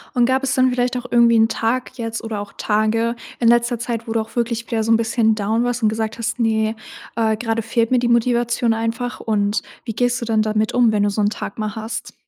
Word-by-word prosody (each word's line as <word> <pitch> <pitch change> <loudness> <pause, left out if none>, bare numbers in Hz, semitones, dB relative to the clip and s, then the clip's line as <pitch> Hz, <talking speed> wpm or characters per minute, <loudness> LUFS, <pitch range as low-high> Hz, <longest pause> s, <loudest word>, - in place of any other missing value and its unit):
Und, 245 -1 +4
gab 260 +2 +1
es 265 0 0
dann 255 -1 +3
vielleicht 250 0 0
auch 250 0 -4
irgendwie 235 -1 +5
'n 225 0 +5
Tag 230 +3 -1
jetzt 225 -1 -4
oder 220 -2 -4
auch 205 -1 -8
Tage 225 +2 0 0.2
in 235 - +4
letzter 240 0 +3
Zeit, 230 0 -4
wo 225 - -4
du 225 - +1
auch 220 - -8
wirklich 235 -1 -1
wieder 225 -1 0
so 225 - -1
'n - - +6
bisschen 225 0 +2
down 220 +3 0
warst 245 0 -2
und 215 - +4
gesagt 220 +1 -3
hast: 230 +2 -3
„Ne, 220 -1 +1 0.4
äh, 220 -1 +1
gerade 225 0 -2
fehlt 230 +1 0
mir 255 - +4
die 240 0 +1
Motivation 240 0 +2
einfach“, 230 +2 -3
und 210 -1 0 0.2
wie 230 - -4
gehst 245 +2 +1
du - - -3
dann 220 -2 +1
damit 215 +1 0
um, 240 -3 +4
wenn 210 -1 +1
du 205 - +2
so 205 - -2
'n 205 0 +2
Tag 210 - -6
mal 215 -1 -3
hast? 225 +2 -6
230 Hz, 250 wpm, -20 LUFS, 220-240 Hz, 0.4 s, n